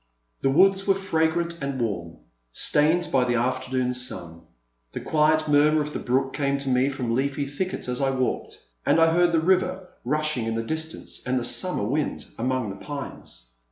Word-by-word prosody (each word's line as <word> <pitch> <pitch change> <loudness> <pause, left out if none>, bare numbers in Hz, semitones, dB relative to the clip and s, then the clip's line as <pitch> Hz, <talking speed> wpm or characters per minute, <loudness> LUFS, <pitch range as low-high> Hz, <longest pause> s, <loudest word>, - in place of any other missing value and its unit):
The 135 - +2
woods 195 +6 +4
were 195 - +4
fragrant 170 -2 0
and 140 -1 -3
warm, 85 -8 -3 0.3
stained 155 - +2
by 130 -2 +3
the 120 -1 0
afternoon 130 +1 0
sun; 85 -10 -5 0.5
the - - -4
quiet 155 0 +2
murmur 150 +1 +4
of 150 0 -3
the - - -3
brook 135 +2 0
came 140 -1 0
to 140 -1 -3
me 130 +1 +3
from 125 -4 -2
leafy 140 +3 0
thickets 145 +6 -4
as 125 +2 -1
I 135 - +2
walked, 130 -1 -2 0.3
and - - +3
I 165 0 +5
heard 175 0 +4
the 165 - +3
river 185 +2 +1
rushing 155 -6 -1
in 115 - -1
the 115 - -1
distance 160 +5 -4
and 130 +1 0
the - - -4
summer 180 - +1
wind 145 +6 -2
among 125 -3 -1
the 95 - -8
pines. 140 - -8
140 Hz, 185 wpm, -25 LUFS, 125-160 Hz, 0.5 s, I